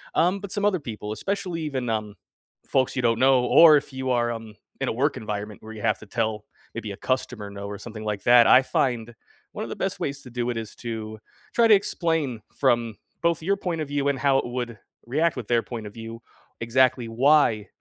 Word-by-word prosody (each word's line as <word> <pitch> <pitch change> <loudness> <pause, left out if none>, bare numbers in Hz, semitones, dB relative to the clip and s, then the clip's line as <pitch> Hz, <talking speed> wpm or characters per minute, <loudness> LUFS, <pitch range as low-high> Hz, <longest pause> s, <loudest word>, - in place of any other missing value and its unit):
um, 180 +4 +2
but 200 -1 -8
some 205 0 -1
other 200 -3 +2
people, 105 -6 -6
especially 180 - -3
even, 135 -6 -3
um, 105 -2 -2 0.5
folks 130 -1 +1
you 130 - 0
don't 115 -2 +2
know, 130 -1 +4
or 155 +3 +8
if 140 - -5
you 130 0 -3
are, 120 -1 +1
um, 115 -2 -7 0.3
in - - 0
a - - -1
work 140 +6 0
environment 105 -1 -5
where 110 0 -9
you 110 - -9
have - - +1
to - - -12
tell 110 0 -2 0.3
maybe 115 -2 -5
a 100 - -8
customer 125 -5 -2
no, 100 0 -7
or 100 0 -6
something 110 +1 -8
like 105 -2 -3
that, 120 -1 +7
I 130 - +8
find 120 -3 -1 0.4
one - - -4
of - - -6
the - - -5
best - - -3
ways 140 0 -3
to 125 - -12
do 120 0 -2
it 120 - -2
is 110 -2 -6
to 110 -2 -5 0.4
try 235 -1 +4
to 220 - +7
explain 165 - 0
from 120 -5 +1 0.2
both 170 -1 +1
your 195 +5 +1
point 175 -4 -3
of 155 - -3
view, 140 0 -1
and 135 -2 -1
how 140 -2 +3
it - - -3
would 120 -2 -4 0.3
react 155 +6 +1
with 125 -5 -6
their 120 -1 +2
point 115 -3 -6
of 105 - -11
view 115 +1 -8 0.4
exactly 125 +1 +2
why 115 -3 +3
120 Hz, 225 wpm, -25 LUFS, 110-145 Hz, 0.5 s, or